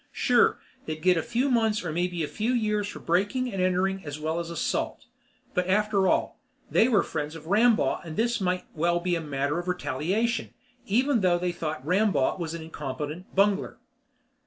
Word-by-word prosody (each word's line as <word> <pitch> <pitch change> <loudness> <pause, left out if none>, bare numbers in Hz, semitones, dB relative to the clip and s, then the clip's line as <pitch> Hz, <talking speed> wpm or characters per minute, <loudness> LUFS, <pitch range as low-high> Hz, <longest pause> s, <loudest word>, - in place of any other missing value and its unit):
Sure, - - +3 0.3
they'd 155 0 -5
get 185 -1 +5
a 165 - +1
few 250 - 0
months 220 -5 +1
or 165 - -2
maybe 175 0 -1
a - - -1
few 225 +8 -1
years 210 -3 0
for - - -7
breaking 205 +8 0
and 190 - -1
entering 185 +1 +1
as 145 -1 -6
well 160 +2 -1
as 170 -1 -4
assault, 170 -2 -2 0.5
but 180 0 0
after 200 0 +2
all, - - 0 0.3
they 225 - +5
were 220 -6 +3
friends 150 +2 -4
of 160 -1 -10
Rambaugh 215 +5 +3
and 160 -2 -8
this 235 0 +1
might 180 -1 0
well 170 +2 +1
be 180 0 -1
a 165 - -2
matter 145 +1 -1
of 175 - -6
retaliation, 180 - -1 0.3
even 250 +3 +2
though 180 -2 +3
they 180 0 -1
thought 155 -5 -5
Rambaugh 185 -3 +2
was 165 -1 -3
an 165 - -6
incompetent 150 +2 -6
bungler. 200 0 +2
180 Hz, 185 wpm, -27 LUFS, 160-210 Hz, 0.5 s, get